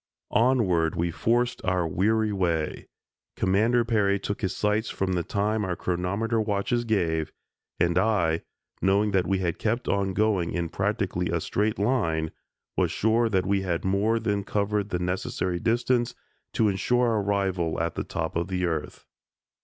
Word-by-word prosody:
Onward 100 -10 +3
we 85 0 0
forced 120 +7 0
our 90 -2 +1
weary 105 +6 +1
way. 85 -5 -1 0.5
Commander 115 +5 +2
Peary 105 -4 +2
took 100 +1 -4
his 95 - -1
sights 105 +2 0
from 95 -1 -1
the 90 - +1
time 105 +5 -1
our 90 -3 -1
chronometer 100 +7 -1
watches 110 +3 0
gave, 80 -8 0 0.5
and 85 0 +2
I, 90 -6 +2 0.4
knowing 100 +2 +3
that 95 -3 +1
we 95 - +2
had 90 -3 -2
kept 115 +3 -1
on 95 -1 0
going 105 -5 +1
in 85 -1 -2
practically 95 -2 -1
a 85 - 0
straight 105 +7 -1
line, 85 -9 0 0.4
was - - +2
sure 115 +2 +2
that 95 -4 +1
we 100 0 +1
had 90 -2 -2
more 100 +4 +2
than 105 -3 -1
covered 105 0 -1
the 90 - -1
necessary 90 0 -2
distance 120 +2 +1 0.4
to 110 - +3
insure 120 +5 +2
our 110 -2 +1
arrival 95 -5 0
at 85 0 -1
the - - -3
top 80 -1 -4
of 85 +1 0
the 90 -1 -1
earth. 80 -3 -4
100 Hz, 160 wpm, -26 LUFS, 90-110 Hz, 0.5 s, Onward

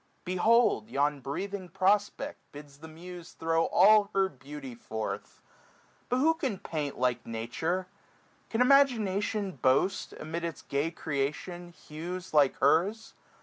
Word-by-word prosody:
Behold 185 - +3
yon 145 +3 +1
breathing 185 +7 -5
prospect 200 - 0
bids 145 -1 -12
the 160 - -10
muse 175 +2 -10
Throw 165 0 +1
all 205 +1 +5
her 195 -1 +3
beauty 135 -1 -9
forth* 110 -2 -6 0.7
But 250 - +1
who 310 +5 +4
can 270 - -3
paint 150 -5 -4
465 - - -12
Like 125 -1 0
Nature? 120 +11 -2 0.6
Can 225 - 0
imagination 220 -7 +3
boast. 135 +9 +2
Amid 165 +2 -5
its 165 -4 -5
gay 140 +3 -1
creation, 165 +3 -4
hues 170 +2 -7
like 145 -3 +4
hers 180 +10 +2
170 Hz, 130 wpm, -29 LUFS, 145-200 Hz, 0.7 s, all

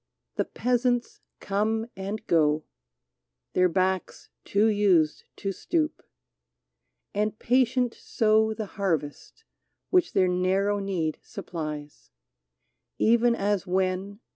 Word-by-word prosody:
The - - -1
peasants 245 0 0 0.2
come 215 +3 0
and 195 +3 -5
go, 155 -2 +2 0.4
— - - -58
Their 180 0 +4
backs 185 +1 -1
too 205 +2 +2
used 195 -8 +3
to 195 - -3
stoop, 310 - -1 0.6
— - - -56
and 210 +1 -1
patient 250 0 +2
sow 220 0 +2
The 215 0 -4 0.2
harvest 160 - -2 0.5
which 360 -2 +3
their 185 - +4
narrow 190 +3 +1
need 180 -6 -2
supplies; 150 -3 -7 0.9
Even 235 +1 +4
as 200 -2 -1
when. 190 +3 -1
200 Hz, 110 wpm, -26 LUFS, 180-225 Hz, 0.9 s, Their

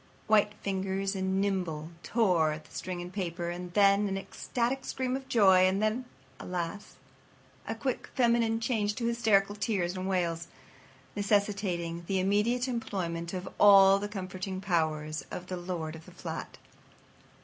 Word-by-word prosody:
White 210 -1 +3
fingers 195 0 -1
and 190 0 0
nimble 180 -6 -1
tore 175 -6 +2
at 155 0 -9
the - - -20
string 180 -1 -4
and 180 +1 -9
paper. 175 -3 -3
And 175 0 -6
then 200 0 +5
an 195 0 -2
ecstatic 240 +6 -2
scream 260 -1 -2
of 265 0 -6
joy; 190 -7 +6
and 190 +1 +1
then, 215 +4 0 0.3
alas! 180 +2 -5 0.7
a 225 - -2
quick 255 +2 -3
feminine 235 -3 +3
change 215 -3 0
to 240 - -3
hysterical 220 -4 +2
tears 195 -4 -1
and 185 +1 -3
wails, 170 -3 -1 0.7
necessitating 195 -5 0
the 190 -1 +1
immediate 210 +7 +1
employment 175 -8 -3
of 185 0 -5
all 195 -1 +8
the 205 +1 -4
comforting 185 -1 -5
powers 155 -5 -1
of 180 - -6
the 185 - -4
lord 175 -3 -4
of 160 - -12
the - - -13
flat. - - -7
195 Hz, 150 wpm, -30 LUFS, 175-210 Hz, 0.7 s, all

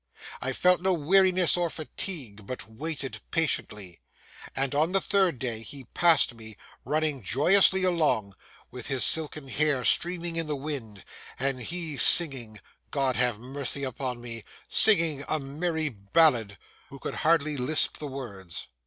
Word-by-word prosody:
I 130 - -2
felt 180 +6 +2
no 190 0 +1
weariness 185 +2 +4
or 175 -1 -1
fatigue, 140 - -6
but 125 -5 -7
waited 140 +4 -5
patiently, 105 - -2 0.5
and 135 0 0
on 155 +5 +1
the 195 - +4
third 190 -6 +1
day 120 -3 -4
he 135 +4 -9
passed 165 -7 +4
me, 110 -2 -11 0.3
running 155 -3 -1
joyously 185 - +4
along, 155 - 0 0.4
with 125 -2 -7
his 135 -3 +1
silken 155 -3 +2
hair 145 -1 0
streaming 170 -1 +1
in 165 -1 -2
the 150 - -2
wind, 135 -8 -6 0.3
and 135 -1 -2
he 165 +1 -4
singing—God 130 - +1
have 125 -3 0
mercy 140 +2 -4
upon 130 -1 -4
me!—singing 145 - +2
a 155 - 0
merry 155 +3 -3
ballad,—who 115 +2 0
could - - -6
hardly 155 -2 +2
lisp 140 +4 +1
the 150 - -6
words. 100 -11 -8
140 Hz, 135 wpm, -27 LUFS, 125-165 Hz, 0.5 s, weariness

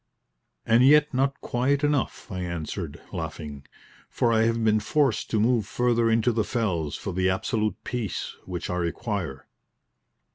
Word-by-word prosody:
"And 115 +2 +5
yet 150 +2 +6
not 135 +2 +1
quiet 135 +4 0
enough," 145 -5 -1
I 95 - -4
answered, 85 -2 -4
laughing, 75 -4 -6 0.4
"for 120 -1 +1
I 110 0 +4
have 115 0 +1
been 110 -1 +4
forced 140 +1 +1
to 110 - +1
move 115 -2 +2
further 120 0 +2
into 115 +2 +3
the 110 -1 +1
fells 95 - -1
for - - -5
the 95 +1 +2
absolute 105 +2 0
peace 120 -7 -4
which 90 -2 -4
I 90 - -1
require." 90 - -3
110 Hz, 150 wpm, -26 LUFS, 90-120 Hz, 0.4 s, yet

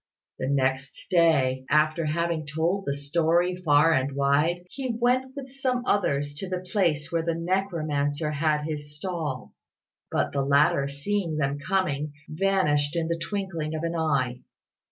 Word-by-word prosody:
The 130 - -2
next 135 0 -1
day, 140 -7 +3
after 155 +2 +3
having 160 0 -1
told 165 +7 -1
the 140 - +1
story 165 +5 +1
far 160 -2 +4
and 135 -1 0
wide, 145 +6 +1
he 265 -2 -4
went 255 +2 +1
with 270 -2 -7
some 255 -2 -1
others 145 - +1
to 190 - -5
the 185 - -1
place 160 -8 +1
where 165 -1 +1
the 165 0 -1
necromancer 155 -5 -1
had 150 0 +1
his 150 -1 -5
stall; 155 -7 -4 0.6
but - - 0
the 140 - +1
latter, 140 0 +3
seeing 160 +4 -2
them 140 -1 -1
coming, 150 -3 -1
vanished 155 -4 +1
in 165 -1 -1
the 170 0 -1
twinkling 170 -5 -3
of 155 - -4
an 165 0 -1
eye. 140 -7 0
155 Hz, 155 wpm, -26 LUFS, 145-180 Hz, 0.6 s, far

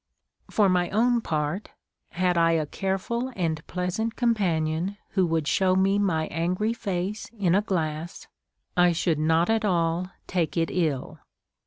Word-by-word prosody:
* - - -57
For 210 -2 +3
my 180 -1 +2
own 235 +3 +2
part, 155 +3 -2 0.4
had 180 0 +1
I 165 0 +4
a 160 -2 +1
careful 200 - -2
and 160 -4 -1
pleasant 180 +6 -2
compan 200 -10 +1
ion 170 +6 -2
who 185 -3 +1
would 160 -2 0
show 185 +2 +3
me 195 +2 +3
my 165 -6 +1
angry 180 +7 0
face 200 -1 -3
in 185 -4 +2
a 200 - +4
glass, 165 -4 -3 0.5
I 175 -1 +5
should 165 -2 0
not 160 +2 +3
at 225 0 +1
all 175 -2 +1 0.2
take 175 -2 -1
it 165 0 +1
ill. 155 -7 -1
180 Hz, 160 wpm, -26 LUFS, 165-200 Hz, 0.5 s, I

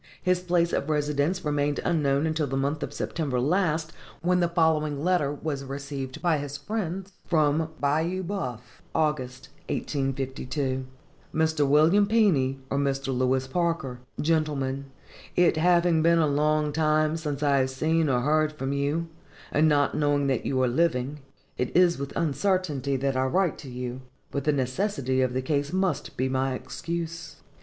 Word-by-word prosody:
His 180 0 +2
place 175 -1 +1
of 140 - -1
residence 150 +4 0
remained 145 -1 0
unknown 145 -3 +2
until 155 -2 0
the 135 +1 -2
month 140 +3 -1
of - - -3
September 140 -6 -2
last, 160 +2 +1 0.3
when 180 +1 +3
the 175 -1 +2
following 155 -4 +1
letter 175 -6 +2
was 145 -1 -4
received 135 0 -6
by 165 -4 +2
his 145 0 -5
friends: 190 +2 -4 0.2
Bayou 160 +2 +1
Beouf, 130 - -5
August, 135 -5 -1 0.2
1852. 135 -1 -2 0.5
MR. 160 -2 +2
WILLIAM 160 +8 +5
PENY, 175 -13 +3
or 140 - +1
MR. 135 -1 -1
LEWIS 130 +1 +1
PARKER. 165 -6 -1 0.2
GENTLEMEN: 145 -4 0 0.5
It 175 -2 +4
having 170 0 +4
been 170 +1 +4
a 165 - +4
long 150 +1 +1
time 155 0 +2
since 150 -3 -3
I 140 -1 +3
have 130 0 +1
seen 155 +4 +1
or 125 -2 +2
heard 155 +3 +2
from 135 -2 -3
you, 145 +4 -1 0.4
and 155 +1 +4
not 145 -1 +2
knowing 145 -1 +1
that 135 -4 0
you 130 - 0
are - - +3
living, 135 0 0 0.4
it 125 +6 0
is 175 -4 +4
with 140 0 -4
uncertainty 155 -3 0
that 135 0 0
I 130 0 +1
write 180 +3 +1
to 135 - -9
you; 125 0 -5 0.3
but 140 -1 -3
the 150 - +4
necessity 130 -1 0
of 130 -1 +1
the 130 0 -1
case 145 +1 -1
must 190 0 -1
be 130 - +1
my 130 0 0
excuse. 170 +3 -5
150 Hz, 160 wpm, -26 LUFS, 135-165 Hz, 0.5 s, WILLIAM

